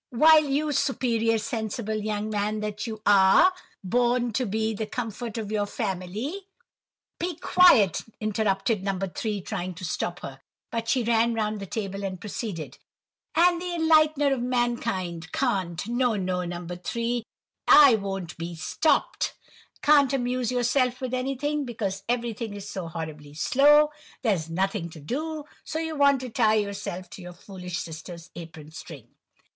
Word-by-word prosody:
"—while 310 +5 +6
you, 295 +2 0
superior, 230 -5 +1
sensible 220 0 -3
young 215 0 -2
man 210 +1 -1
that 210 +1 -4
you 220 -1 -5
are, 200 - +6 0.3
born 240 +3 +1
to 250 +2 0
be 220 +2 -1
the 215 +1 -4
comfort 230 0 -5
of 215 -2 -4
your 205 -1 0
family—" 215 - -4 0.7
"Be 350 0 -2
quiet!" 290 - +5 0.2
interrupted 210 -1 0
No. 195 -1 -1
3, 195 +2 -3
trying 180 0 -4
to 185 +2 -7
stop 175 +1 -3
her; 135 -1 -8 0.3
but 230 0 -3
she 255 -3 +2
ran 230 0 +2
round 215 -1 -1
the 195 - -6
table 200 -1 -4
and 185 -2 -4
proceeded:— 175 - -6 0.6
"—and 345 +1 +4
the 355 -1 -3
enlightener 310 -3 +4
of 260 - -2
mankind; 230 -9 -1
can't—no, 215 +7 0
no, 185 -2 -1
No. 175 0 -6
3, 235 +6 -2 0.4
I 285 -4 +9
won't 195 -5 -3
be 170 +1 -5
stopt!—can't 290 - +1
amuse 250 -2 0
yourself 250 0 +1
with 255 -1 -4
anything, 275 +3 -1
because 205 -6 -3
everything 230 -3 -2
is 200 0 -8
so 190 -4 -5
'horribly 155 -3 -7
slow, 295 - +5 0.3
there's 185 -9 0
nothing 190 +1 -1
to 160 - -11
do,' 300 - -4 0.2
so - - -4
you 320 -1 -3
want 280 -2 +4
to 255 - -5
tie 220 -2 +3
yourself 200 -3 -3
to - - -9
your 180 0 -9
foolish 180 -1 -7
sister's 165 +1 -8
apron 160 -2 -10
string." 155 -7 -10
220 Hz, 150 wpm, -26 LUFS, 185-255 Hz, 0.7 s, I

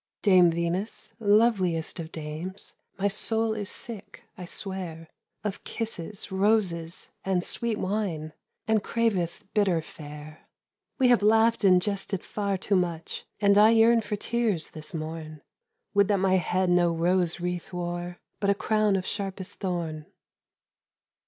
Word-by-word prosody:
"Dame 185 -4 +6
Venus, 170 +5 -2
loveliest 205 -7 +2
of 165 0 -6
dames, 160 +5 -6 0.2
My 200 +1 +1
soul 220 +2 +1
is 205 -2 -4
sick, 215 -4 -7
I 180 - -8
swear, 175 -4 -4 0.3
Of 205 -2 -4
kisses, 210 -3 -5
roses 190 -4 +1
and 185 -2 0
sweet 230 +1 0
wine, 185 -7 -2 0.3
And 220 -2 +2
craveth 205 -8 0
bitter 195 -5 +3
fare. 150 -1 -10 0.5
"We 255 -3 +4
have 240 -3 +5
laughed 225 +2 +4
and 185 -2 +6
jested 195 0 -3
far 200 -2 -2
too 195 +2 0
much, 170 -3 -2
And 200 -1 +5
I 215 +1 +8
yearn 230 +1 +5
for 210 - -3
tears 215 -6 -1
this 155 +1 -8
morn. 155 -1 -6 0.5
Would 200 -1 +4
that 205 -1 +2
my 190 0 +3
head 180 +1 +1
no 175 -1 +4
rose 175 +1 +1
wreath 175 0 -3
wore, 175 0 -4 0.2
But 200 - +1
a 200 - +4
crown 215 -1 +2
of 185 -1 -1
sharpest 195 -2 -4
thorn." 170 -5 -3
190 Hz, 140 wpm, -27 LUFS, 170-210 Hz, 0.5 s, I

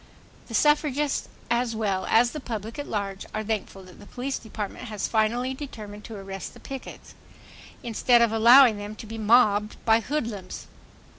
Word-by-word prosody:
The 230 - -5
suffragists 295 0 +2 0.2
as 235 -1 +1
well 200 -4 -1
as 240 +1 +4
the 305 - -5
public 225 -1 -6
at 290 - -5
large 200 -2 -4
are 215 - -2
thankful 205 -3 -4
that 185 -1 -15
the 205 - -13
police 265 +2 -4
department 220 +1 -6
has 215 -4 -3
finally 235 +4 +1
determined 215 -7 -9
to 225 - -8
arrest 195 -1 -7
the - - -13
pickets, 270 -1 -9 0.7
instead 240 +1 +3
of 235 -2 +3
allowing 235 0 +7
them 205 +1 -7
to 220 - -10
be 225 +1 -7
mobbed 210 -1 +3
by 225 0 +5
hoodlums 225 -7 -4
225 Hz, 165 wpm, -26 LUFS, 210-250 Hz, 0.7 s, allowing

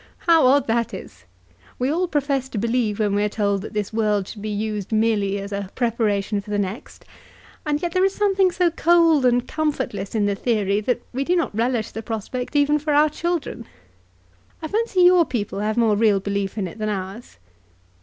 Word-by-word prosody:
How 330 -6 +5
odd 275 +1 +4
that 230 0 -1
is! 95 -2 -11 0.5
We 255 +3 0
all 355 +3 0
profess 280 -4 -1
to 230 - -6
believe 230 -1 0
when 210 -2 0
we're 205 +1 +1
told 200 -2 0
that 220 - -8
this 210 0 -3
world 210 -3 0
should 210 - -9
be 215 - -4
used 210 -1 -3
merely 215 -3 +1
as 200 0 -6
a 200 -1 -4
preparation 215 -4 0
for 205 - -15
the 205 - -1
next; 205 +3 -5 0.6
and 295 -1 +1
yet 345 - -1
there 370 +2 +2
is 390 0 +1
something 390 -3 +2
so 350 -1 +1
cold 330 -5 +4
and 245 0 +1
comfortless 280 -11 -3
in 210 -2 +2
the 205 - +1
theory 205 -2 0
that 245 +2 -1
we 265 +2 -1
do 355 +6 +1
not 340 -9 0
relish 235 -1 0
the 225 - -6
prospect 235 +5 -5
even 290 +1 +3
for 300 0 -1
our 300 +1 +5
children. 340 -6 -3 1.0
I 315 - -5
fancy 430 -3 0
your 355 -1 +6
people 210 -9 -3
have 215 +2 -1
more 225 -3 +3
real 210 -2 +3
belief 200 +1 -3
in 195 -3 -1
it 180 - -11
than 215 0 -1
ours." 195 - -6
230 Hz, 200 wpm, -22 LUFS, 205-295 Hz, 1.0 s, your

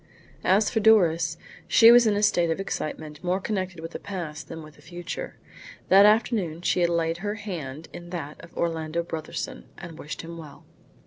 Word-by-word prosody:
As 205 +3 +3
for 225 - +1
Doris, 170 -7 +4 0.3
she 230 0 +8
was 240 -1 +7
in 210 - +2
a 205 - 0
state 175 -4 +3
of 165 - -1
excitement 155 -4 -5
more 180 +1 0
connected 185 -4 -3
with 165 +1 -7
the - - -6
past 170 -6 -6
than 165 -1 -8
with 155 -1 -14
the - - -18
future. 175 - -7 0.5
That 200 +2 +8
afternoon 210 -7 +1
she - - +1
had 175 -1 +3
laid 165 -1 0
her 205 +3 -3
hand 165 -9 -6
in 175 0 -9
that 160 -4 -7
of 170 - -14
Orlando 165 0 -1
Brotherson, 170 - -6
and 170 -3 -10
wished 150 - -7
him 170 0 -8
well. 150 -3 -12
170 Hz, 190 wpm, -25 LUFS, 160-200 Hz, 0.5 s, she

